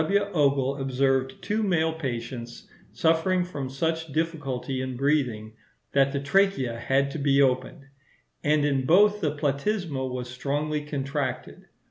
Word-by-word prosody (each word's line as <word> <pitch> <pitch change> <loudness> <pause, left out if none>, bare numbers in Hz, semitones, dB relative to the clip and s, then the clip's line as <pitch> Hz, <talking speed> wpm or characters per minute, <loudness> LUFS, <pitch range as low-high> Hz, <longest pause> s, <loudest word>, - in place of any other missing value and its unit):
W. 200 +6 +2
Ogle 140 -3 +2
observed 135 0 0
two 215 +2 0
male 165 -6 +1
patients, 120 -5 -5 0.2
suffering 165 +3 +2
from 145 -7 -5
such 160 +3 -2
difficulty 135 -5 -2
in 130 -1 -4
breathing, 125 -6 0 0.4
that 140 0 +3
the 140 - -1
trachea 140 -6 +1
had 135 +3 +1
to 155 - -5
be 140 -1 +3
opened, 135 +2 +1 0.6
and 150 0 +3
in 135 -3 0
both 205 +5 +5
the 150 -2 0
platysma 145 -2 -1
was 125 -1 -4
strongly 145 +4 -2
contracted. 140 -2 -4
140 Hz, 135 wpm, -26 LUFS, 130-160 Hz, 0.6 s, both